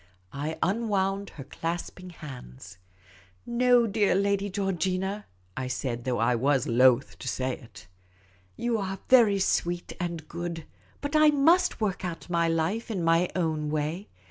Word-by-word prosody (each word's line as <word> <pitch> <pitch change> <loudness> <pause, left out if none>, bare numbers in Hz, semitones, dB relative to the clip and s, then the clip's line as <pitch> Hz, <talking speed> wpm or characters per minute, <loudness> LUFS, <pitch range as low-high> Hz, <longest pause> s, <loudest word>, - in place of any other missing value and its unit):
I 150 +3 -3
unwound 200 -1 0
her 135 - -6
clasping 170 +5 -5
hands. 95 - -11 0.3
" 90 -2 -24 0.2
No, 245 0 +4
dear 205 -3 +2
Lady 200 +1 +1
Geor 195 0 -1
gina," 190 +4 -2 0.3
I 130 -1 -3
said, 125 -2 -3
though 125 -2 0
I 115 +2 +2
was 135 +2 +2
loth 125 +1 +3
to - - -7
say 130 0 -1
it. 115 - -14 0.4
" - - -31 0.3
You 235 -2 0
are 195 -1 -3
very 230 -6 +6
sweet 175 -2 0
and 170 -3 -4
good, 170 -1 -5 0.4
but 285 +1 -3
I 305 0 +7
must 300 +5 +3
work 205 -4 -1
out 175 0 -5
my 170 -1 +2
life 165 +9 -1
in 190 -6 -2
my 165 +2 +3
own 160 -4 -1
way. 155 +6 -2
175 Hz, 160 wpm, -27 LUFS, 145-200 Hz, 0.4 s, I